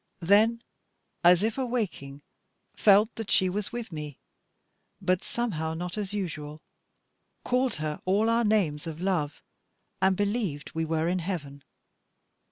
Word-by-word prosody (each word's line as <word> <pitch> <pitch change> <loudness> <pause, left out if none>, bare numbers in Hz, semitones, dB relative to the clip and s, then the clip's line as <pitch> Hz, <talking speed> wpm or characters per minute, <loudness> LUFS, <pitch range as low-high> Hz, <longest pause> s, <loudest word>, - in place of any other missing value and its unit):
Then, 220 +6 +4 0.6
as 175 +2 +6
if 225 +4 0
awaking, 195 - -3 0.5
felt 210 +2 +5
that 225 -2 -5
she 185 - +3
was 200 +2 -3
with 235 -3 -5
me, 150 -3 -6 0.8
but 185 0 +1
somehow 160 -10 -2
not 175 +1 -4
as 205 -2 -3
usual; 155 -7 -5 0.8
called 250 -1 +1
her 150 0 -4
all 200 +4 +2
our 230 +1 +3
names 175 -9 +1
of 160 -1 -6
love, 175 -6 -1 0.6
and 190 -1 +3
believed 200 -8 -1
we 160 0 -1
were 160 0 0
in 180 +1 +1
heaven. 155 -6 -5
185 Hz, 135 wpm, -28 LUFS, 160-215 Hz, 0.8 s, as